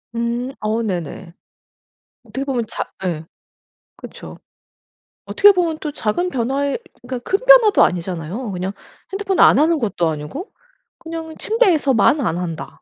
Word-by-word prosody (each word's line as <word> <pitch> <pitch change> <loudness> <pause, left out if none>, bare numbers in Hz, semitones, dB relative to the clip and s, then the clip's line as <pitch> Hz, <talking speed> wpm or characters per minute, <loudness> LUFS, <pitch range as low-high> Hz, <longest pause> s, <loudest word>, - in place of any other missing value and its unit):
음 235 +2 -2
어 215 +2 -1
네네. 180 -3 -4 0.9
어떻게 245 +4 -5
보면 255 -4 -2
자 - - -4 0.2
예. 165 -4 -3 0.7
그쵸. - - -11 0.9
어떻게 410 - +6
보면 345 -4 0
또 300 - -4
작은 285 +9 -1
변화에 275 +1 -1 0.2
그러니까 250 0 -5
큰 400 +6 0
변화도 - - +7
아니잖아요. 180 +5 -2
그냥 185 +1 -3 0.4
핸드폰 390 -1 -2
안 - - +7
하는 320 +1 +3
것도 195 -8 0
아니고 155 - -6 0.5
그냥 325 -1 -7
'침대에서만 310 - +3
안 170 -8 -1
한다.' 165 -3 -6
250 Hz, 280 characters per minute, -20 LUFS, -, 0.9 s, 변화도